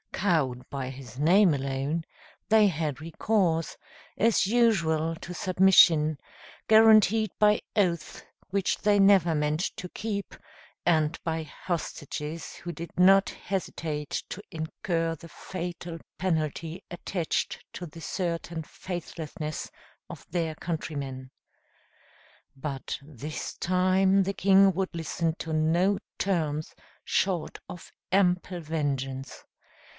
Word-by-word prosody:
Cowed 155 -10 +1
by 135 -2 -4
his 130 -3 -10
name 175 +6 +5
alone, 140 +3 -1 0.5
they 220 -1 +6
had 155 -5 -2
recourse, 165 0 0 0.4
as 225 -3 +3
usual, 170 -8 +2
to 175 +2 -8
submission, 175 -5 +5 0.5
guaranteed 220 -1 +6
by 210 0 +5 0.2
oaths 175 -5 0 0.3
which 195 -1 0
they 205 -1 +3
never 195 -4 +5
meant 150 0 0 0.2
to 180 - -6
keep, 200 -1 -4 0.5
and 160 -2 +2
by 165 -1 -1
hostages 155 -1 -5
who 175 - -6
did 170 0 -7
not 195 +2 +6
hesitate 160 -6 -4
to 200 - -6
incur 165 0 -2
the 165 +2 -13
fatal 175 -1 -6 0.2
penalty 165 0 -2
attached 175 -1 -2
to 175 - -6
the 165 +2 -12
certain 170 -1 -3
faithlessness 155 -3 -6 0.4
of - - -9
their 165 -3 -1
countrymen. 140 -6 -5 1.2
But 135 -1 -5
this 150 +1 -6
time 185 +2 +3
the 195 +1 -2
king 195 0 +5
would 190 +1 -1
listen 165 0 -1
to 160 - -4
no 170 +6 +2 0.2
terms 155 -5 -1 0.3
short 185 -4 0
of 175 - -10 0.2
ample 180 -2 +2
vengeance. 140 -4 -3
170 Hz, 110 wpm, -28 LUFS, 155-190 Hz, 1.2 s, they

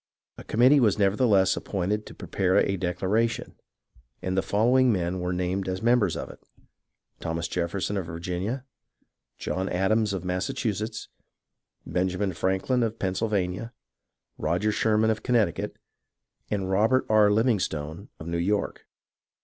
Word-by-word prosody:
A - - -9
committee 130 +6 +5
was 110 -6 +3
nevertheless 100 -1 +3
appointed 100 +2 -2
to - - -11
prepare 95 -1 0
a 100 - +2
declaration, 100 +6 -1 0.7
and 95 0 -2
the 95 - +3
following 125 +6 +3
men 90 -2 -1
were 90 0 -2
named 90 +2 -1
as 95 +3 -3
members 115 -7 +3
of - - -5
it: - - -16 0.8
Thomas 80 0 -3
Jefferson 90 +4 -2
of 90 -4 -3
Virginia, 90 +10 -4 0.7
John 95 +1 -2
Adams 105 +4 +1
of 95 -2 -4
Massachusetts, 105 +4 -2 0.8
Benjamin 95 +1 -1
Franklin 95 +9 0
of 115 -1 -1
Pennsylvania, 95 +1 -1 0.7
Roger 90 +7 +1
Sherman 110 +1 +2
of 110 - -2
Connecticut, 110 -9 0 0.7
and 95 -2 -1
Robert 110 +7 +3
R. 110 -1 +5
Livingstone 100 - 0
of 80 - -8
New 85 0 -2
York. 100 +4 -1
100 Hz, 130 wpm, -26 LUFS, 90-110 Hz, 0.8 s, committee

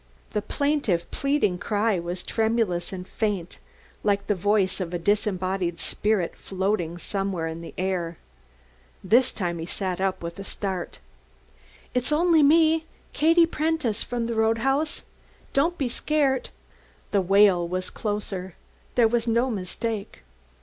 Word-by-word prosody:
The 210 - 0
plaintive 280 - 0
pleading 275 -10 +1
cry 210 -1 +1
was 175 +1 -4
tremulous 220 -6 0
and 185 -1 -6
faint 200 -6 -2 0.4
like 200 -1 +1
the 205 - +2
voice 200 0 +1
of 180 -2 -3
a - - +1
disembodied 185 -2 0
spirit 210 -5 0
floating 190 -3 -2
somewhere 195 -2 -2
in 165 +1 -5
the 170 - -9
air. 180 -3 -2 0.9
This 235 +7 +4
time 175 -4 -3
he 165 - -5
sat 185 -1 -2
up 190 -2 -1
with 170 +2 -6
a - - -4
start. 190 -3 -4 1.0
"It's 250 +3 0
only 330 +1 +4
me 320 +2 +5 0.3
Katie 330 +2 +5
Prentice, 310 -9 -1
from 240 -1 -2
the 235 - -2
Roadhouse. 230 +7 +1 0.5
Don't 330 +6 +2
be 270 - 0
scart." 270 +1 0 0.6
The 200 - +3
wail 190 -2 +5
was 185 +1 -3
closer. 200 -4 -4 0.4
There 235 -2 +6
was 235 +1 0
no 235 +3 +2
mistake. 210 +2 -4
205 Hz, 135 wpm, -25 LUFS, 185-245 Hz, 1.0 s, There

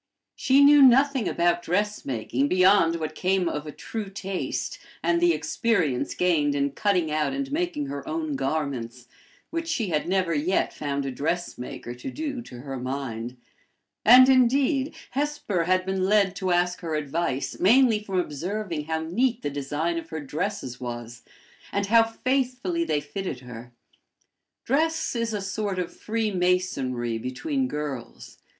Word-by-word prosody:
She 275 +1 +4
knew 290 0 +8
nothing 270 -2 +5
about 175 0 +1
dressmaking 145 - -1
beyond 185 -1 +4
what 155 -2 -4
came 185 +1 +1
of 150 -1 -3
a - - -5
true 215 +5 -6
taste, 195 -6 -4 0.2
and 170 0 +2
the 175 0 +5
experience 160 - 0
gained 150 -5 +2
in 140 0 0
cutting 180 0 +1
out 155 - 0
and 275 0 -3
making 310 -2 -1
her 280 +3 -6
own 315 -2 -2
garments, 125 - -3 0.4
which 330 0 -3
she 250 - -1
had 155 +1 -1
never 185 -3 +1
yet 160 +5 0
found 140 -1 -3
a 135 - -2
dressmaker 140 -5 -4
to 125 - -7
do 285 -3 -4
to 125 - -10
her 135 0 -6
mind; 125 -2 -4 0.7
and, 255 +3 +9
indeed, 265 +3 +3 0.2
Hesper 275 - -1
had 185 +1 +2
been 190 0 0
led 200 -1 +3
to 190 -1 -2
ask 175 0 +1
her 165 -3 -3
advice 145 -2 -2
mainly 225 +2 +4
from 195 -3 -1
observing 175 +1 -3
how 160 0 -2
neat 235 +8 0
the 145 - -2
design 150 +4 -2
of 165 0 -11
her 160 - -4
dresses 150 - -4
was, 120 -1 -6 0.5
and 200 0 0
how 230 +3 +6
faithfully 255 +8 -1
they 150 - 0
fitted 185 0 -5
her. 120 -1 -10 0.9
Dress 320 +3 +1
is 230 -1 -1
a 210 -2 -2
sort 195 0 -3
of 180 -1 -3
freemasonry 180 - -1
between 260 - -2
girls. 150 - -6
180 Hz, 150 wpm, -25 LUFS, 145-230 Hz, 0.9 s, and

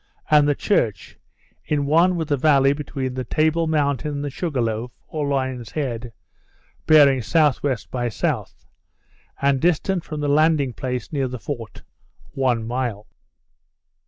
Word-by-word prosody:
and 150 -1 +6
the 145 - +2
church, 110 - -1 0.4
in 145 -2 -1
one 170 +5 +4
with 160 -2 -3
the 145 - +3
valley 140 -1 +4
between 140 -3 -4
the 130 0 -3
Table 160 +5 +1
Mountain 150 -2 0
and 145 0 -4
the 145 - -4
Sugar 155 -3 -3
Loaf, 115 +1 -2 0.2
or 150 -2 -3
Lion's 130 -4 -2
Head, 120 -5 -3 0.8
bearing 145 -4 +6
S.W. 145 0 +2 0.2
by 120 -1 -1
S., 110 - -9 1.2
and 140 -1 +2
distant 175 +1 +1
from 155 -2 -6
the 145 - -1
landing 145 -3 +3
place 125 +3 -4
near 135 -3 0
the 125 0 -6
fort, 115 -4 -7 0.5
one 125 -4 0
mile. 120 -3 -3
140 Hz, 145 wpm, -22 LUFS, 125-150 Hz, 1.2 s, and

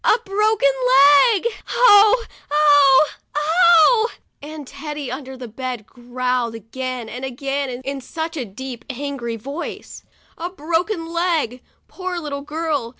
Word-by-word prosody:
"A - - +4
broken 390 - -12
leg! 285 - +4 0.2
Oh! 435 0 +5 0.2
oh! 290 -1 +5 0.3
oh!' 345 +8 +4 0.3
and 300 0 -9
Teddy 290 -1 -7
under 265 0 -7
the 250 -1 -8
bed 245 -1 -6
growled 245 -1 -3
again 250 +2 -6
and 250 +4 -8
again, 270 +2 -3 0.2
in 275 0 -4
such 320 +5 -5
a 280 - -3
deep, 240 +3 -8
angry 265 -3 -5
voice, 275 +9 -7 0.4
"A 345 +2 -4
broken 340 +2 -2
leg! 330 -8 -1 0.3
Poor 370 -1 -5
little 290 -4 -5
girl! 300 -4 -3
285 Hz, 125 wpm, -20 LUFS, 255-330 Hz, 0.4 s, Oh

